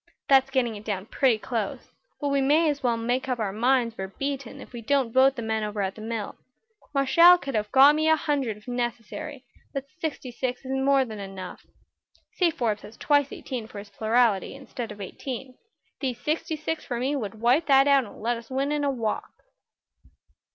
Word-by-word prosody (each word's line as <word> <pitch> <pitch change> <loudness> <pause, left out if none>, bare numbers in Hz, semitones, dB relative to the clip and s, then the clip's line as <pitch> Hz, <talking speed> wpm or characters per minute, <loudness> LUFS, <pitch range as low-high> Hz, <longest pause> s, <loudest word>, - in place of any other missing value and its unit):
That's 270 -1 +5
getting 250 -4 0
it 205 - -9
down 200 -3 -3
pretty 250 0 +2
close, 220 -2 -4 0.3
but 290 - -1
we 280 0 +2
may 300 +5 +4
as 285 - -6
well 240 -2 +1
make 245 +3 -1
up 250 - 0
our 215 -4 -1
minds 240 +1 +2
we're 190 -2 -4
beaten 275 +4 -5
if - - -12
we 240 - -6
don't 260 -1 +1
vote 265 +1 +5
the 235 - -5
men 220 -1 -1
over 210 0 -4
at 190 0 -2
the 215 - -11
mill. 220 -2 -4 0.5
Marshall 335 +6 +6
could 275 -5 -6
have 210 -1 -1
got 275 +2 +8
me 310 +1 +2
a 315 - +6
hundred 280 -9 -1
if 210 - -19
necessary, 245 +4 -4 0.3
but 275 0 -2
sixty 300 -6 -4
six 250 +1 -4
is 260 - -5
more 270 0 +3
than 220 -3 -8
enough. 195 -2 -8 0.7
Say 355 -2 +3
Forbes 235 -10 -1
has 220 - -12
twice 285 -2 +2
eighteen 245 -5 -6
for 215 - -11
his 200 0 -9
plurality, 220 0 +1
instead 255 -3 -7
of 205 - -10
eighteen; 255 +6 -6 0.5
these 255 -4 -2
sixty 310 +3 -1
six 310 +1 -3
for 240 -3 -4
me 270 +4 0
would 220 -5 -4
wipe 250 +8 +3
that 275 -1 +6
out 275 -2 +5
and 205 - -13
let 240 +1 +1
us 230 0 -12
win 270 +2 -1
in 295 -1 0
a 285 - +2
walk." 230 -5 -2
255 Hz, 205 wpm, -26 LUFS, 220-275 Hz, 0.7 s, got